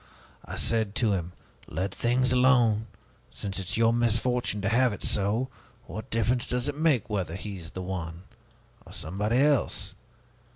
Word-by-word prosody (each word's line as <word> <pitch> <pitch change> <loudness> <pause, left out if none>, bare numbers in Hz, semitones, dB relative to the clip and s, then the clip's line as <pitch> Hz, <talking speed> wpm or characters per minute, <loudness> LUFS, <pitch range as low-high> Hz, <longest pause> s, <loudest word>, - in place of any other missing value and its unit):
I - - -6
said 110 -3 0
to 110 -2 +2
him, 90 -2 -3 0.3
'Let 95 +1 -3
things 125 +1 +2
alone! 120 -4 +4 0.4
Since 100 -1 -5
it 95 - -5
is - - -1
your 115 0 +4
misfortune 120 -1 +1
to 100 - +2
have 125 +1 +3
it - - -7
so, 105 +6 +1 0.4
what 110 -3 -7
difference 120 +2 +1
does 125 +1 -1
it 145 - -2
make 150 -6 +2
whether 95 -7 -2
he 100 +1 -6
is 85 -2 -8
the 95 -1 -6
one, 90 -2 -5 0.6
or - - -13
somebody 105 +8 -1
else?' 130 -9 +2
110 Hz, 165 wpm, -28 LUFS, 95-125 Hz, 0.6 s, alone